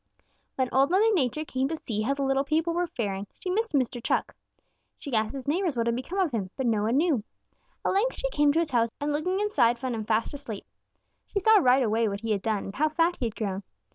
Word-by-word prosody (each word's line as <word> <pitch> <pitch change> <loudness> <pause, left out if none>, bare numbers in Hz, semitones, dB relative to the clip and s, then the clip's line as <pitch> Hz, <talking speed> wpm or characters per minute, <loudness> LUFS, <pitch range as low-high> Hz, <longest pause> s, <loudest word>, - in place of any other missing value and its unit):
"When 260 -1 +1
Old 270 +2 +4
Mother 425 +5 +4
Nature 305 - 0
came 260 -2 -1
to 325 - -2
see 220 -8 -3
how 270 +6 0
the 280 - -2
little 270 0 +2
people 320 +4 0
were 350 +1 0
faring, 200 -7 -3
she 365 - -3
missed 445 +2 0
Mr. 250 -3 0
Chuck. - - 0 0.6
She 280 - -8
asked 220 +1 +1
his 270 -2 -7
neighbors 330 -2 0
what 230 - +1
had 235 0 +1
become 260 +10 -5
of 370 -6 +2
him, 205 -6 -2
but 265 - -1
no 220 -3 +2
one 225 +5 +1
knew. 300 -8 +2 0.6
At - - +2
length 445 +6 +1
she - - -1
came 295 -5 +3
to - - 0
his 335 -4 0
house 230 -2 +2
and 290 +1 -1
looking 365 +6 0
inside 245 - +2
found 255 0 -3
him 220 -2 -4
fast 220 +3 0
asleep. 270 -8 -7 0.6
She - - -5
saw 440 +3 +6
right 255 -4 +4
away 225 0 +1
what 200 0 -3
he 225 -1 -2
had 200 -2 0
done 215 -1 -1
and 195 - -7
how 310 +2 +2
fat 335 +3 +1
he 245 - 0
had 220 - -7
grown. 200 -3 -3
270 Hz, 250 wpm, -27 LUFS, 230-330 Hz, 0.6 s, saw